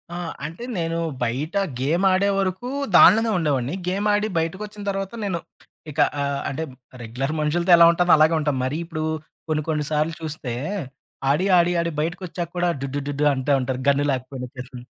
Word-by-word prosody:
ఆ! -, -, -4 dB, 0.3 s
అంటే, 165 Hz, +9 st, -7 dB
నేను 165 Hz, -1 st, -1 dB, 0.3 s
బయట 140 Hz, -, -2 dB, 0.3 s
గేమాడేవరకు 190 Hz, -, +1 dB, 0.3 s
దానిలోనే 225 Hz, +1 st, +7 dB
ఉండేవాడిని. 145 Hz, -3 st, 0 dB
గేమాడి 205 Hz, +3 st, +1 dB
బయటకొచ్చిన 205 Hz, +6 st, -4 dB
తర్వాత, 195 Hz, -1 st, -3 dB
నేను 185 Hz, -4 st, -1 dB, 0.5 s
ఇక 150 Hz, -, -7 dB, 0.2 s
ఆహ్, 140 Hz, 0 st, -1 dB
అంటే 140 Hz, +4 st, -3 dB, 0.4 s
రెగ్యులర్ 125 Hz, +6 st, -3 dB
మనుషులతో 170 Hz, +4 st, +1 dB
ఎలా 170 Hz, -, +8 dB
ఉంటానో 175 Hz, +1 st, +2 dB
అలాగే 155 Hz, +2 st, +5 dB
ఉంటాను. 145 Hz, -3 st, 0 dB
మరి 135 Hz, +4 st, -2 dB
ఇప్పుడు 160 Hz, -2 st, -4 dB, 0.5 s
కొన్ని, 155 Hz, -1 st, +1 dB
కొన్ని 150 Hz, -2 st, 0 dB
సార్లు 155 Hz, +2 st, +1 dB
చూస్తే, 150 Hz, -6 st, -4 dB, 0.8 s
ఆడి, 150 Hz, +7 st, +2 dB
ఆడి, 175 Hz, 0 st, +4 dB
ఆడి 170 Hz, 0 st, -1 dB
బయటకొచ్చాక 175 Hz, +1 st, -4 dB
కూడా 175 Hz, 0 st, +2 dB
డుడ్‌డుడ్‌డుడ్‌డూ 140 Hz, +1 st, -2 dB
అంటా 130 Hz, +2 st, 0 dB
ఉంటారు, 130 Hz, 0 st, -2 dB
గన్ను 140 Hz, +1 st, +3 dB
లేకపోయినా 130 Hz, 0 st, -5 dB
ఒచ్చేసి. 125 Hz, 0 st, -9 dB
160 Hz, 150 wpm, -23 LUFS, 140-180 Hz, 0.8 s, ఎలా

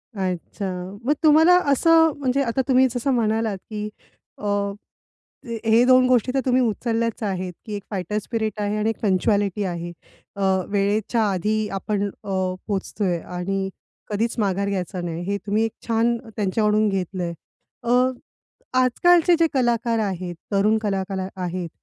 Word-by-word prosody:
अच्छा. 185 Hz, 0 st, -4 dB
मग 290 Hz, -, +3 dB
तुम्हाला 320 Hz, +4 st, +7 dB, 0.2 s
असं 325 Hz, +3 st, +5 dB
म्हणजे 270 Hz, 0 st, +1 dB
आता 245 Hz, +2 st, 0 dB
तुम्ही 260 Hz, -1 st, +5 dB
जसं 245 Hz, +3 st, -1 dB
म्हणालात 220 Hz, -3 st, 0 dB
की 210 Hz, -1 st, -4 dB, 0.5 s
अ, 210 Hz, -, -8 dB, 1.2 s
हे 225 Hz, +2 st, +5 dB
2 255 Hz, 0 st, +6 dB
गोष्टी 250 Hz, 0 st, +3 dB
तर 270 Hz, -, +2 dB
तुम्ही 255 Hz, 0 st, +3 dB
उचलल्याच 230 Hz, 0 st, -1 dB
आहेत, 185 Hz, -2 st, -2 dB
की 215 Hz, -, -6 dB
1 200 Hz, -, -6 dB
फायटर 195 Hz, +1 st, -2 dB
स्पिरिट 220 Hz, 0 st, -3 dB
आहे 205 Hz, +1 st, -1 dB
आणि 215 Hz, +1 st, +1 dB
1 225 Hz, -, -4 dB
पंक्चुअलिटी 200 Hz, 0 st, +1 dB
आहे. 175 Hz, -2 st, -4 dB, 0.4 s
अ, 200 Hz, -, -5 dB, 0.3 s
वेळेच्या 210 Hz, +3 st, +1 dB
आधी 210 Hz, +4 st, 0 dB
आपण 200 Hz, +1 st, -2 dB
अ, 200 Hz, -, -10 dB, 0.4 s
पोहोचतोय 195 Hz, -3 st, -1 dB
आणि 190 Hz, +2 st, -3 dB, 0.4 s
कधीच 225 Hz, +3 st, -1 dB
माघार 200 Hz, -1 st, 0 dB
घ्यायचा 185 Hz, -1 st, -3 dB
नाही, 170 Hz, -1 st, -4 dB
हे 200 Hz, +2 st, -1 dB
तुम्ही 210 Hz, +2 st, +2 dB
एक 225 Hz, -, -3 dB, 0.2 s
छान 230 Hz, +1 st, +2 dB, 0.2 s
त्यांच्याकडून 210 Hz, +1 st, +2 dB
घेतलंय. 180 Hz, -2 st, -2 dB, 0.5 s
अ, 235 Hz, -, -1 dB, 0.9 s
आजकालचे 345 Hz, +7 st, +4 dB
जे 330 Hz, -, +5 dB
कलाकार 235 Hz, -3 st, +1 dB
आहेत, 185 Hz, -4 st, -2 dB, 0.2 s
तरुण 210 Hz, +2 st, +3 dB
कला 200 Hz, -3 st, -1 dB
कलाकार 190 Hz, -1 st, -4 dB
आहेत, 175 Hz, -1 st, -3 dB
210 Hz, 145 wpm, -23 LUFS, 190-235 Hz, 1.2 s, तुम्हाला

